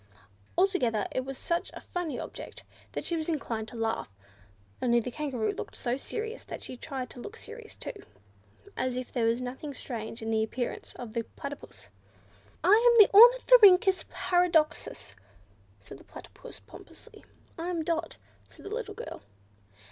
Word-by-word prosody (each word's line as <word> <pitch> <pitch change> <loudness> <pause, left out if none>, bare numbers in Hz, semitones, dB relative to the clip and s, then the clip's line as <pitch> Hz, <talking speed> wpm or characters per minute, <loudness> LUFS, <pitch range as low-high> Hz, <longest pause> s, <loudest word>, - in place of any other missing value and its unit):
Altogether 255 - +2
it 255 - -2
was 270 0 -5
such 340 0 -1
a - - -7
funny 355 -4 -4
object - - -8 0.3
that - - -3
she 340 - -1
was 320 0 -3
inclined 230 -8 -2
to 240 - -11
laugh, 225 - -2 0.7
only 240 -1 +4
the 245 +2 -4
Kangaroo 250 -6 -2
looked - - -7
so 240 0 -1
serious, 445 - -5
that - - -7
she - - -7
tried 255 0 -6
to - - -11
look 425 - -8
serious 450 -1 -11
too, - - -6 0.8
as 255 -1 -1
if 255 0 -5
there 235 -3 +1
was 235 +2 +1
nothing 265 +3 -6
strange 225 -3 -6
in 225 - -2
the 220 0 +2
appearance 245 +2 -4
of 235 -3 -8
the 235 - 0
Platypus. 280 - -8 0.7
"I 370 +4 +6 0.2
am 470 - +4
the 425 -3 +8
Ornithorhynchus 430 -5 +8
Paradoxus!" 340 - +1 0.6
said 100 +7 -12
the - - -15
Platypus - - -12
pompously. - - -14 0.4
"I 335 - -3
am 335 -3 -1
Dot," 330 0 -2 0.3
said - - -16
the 400 - -5
little 435 -3 -4
girl. - - -7
285 Hz, 165 wpm, -29 LUFS, 240-370 Hz, 0.8 s, the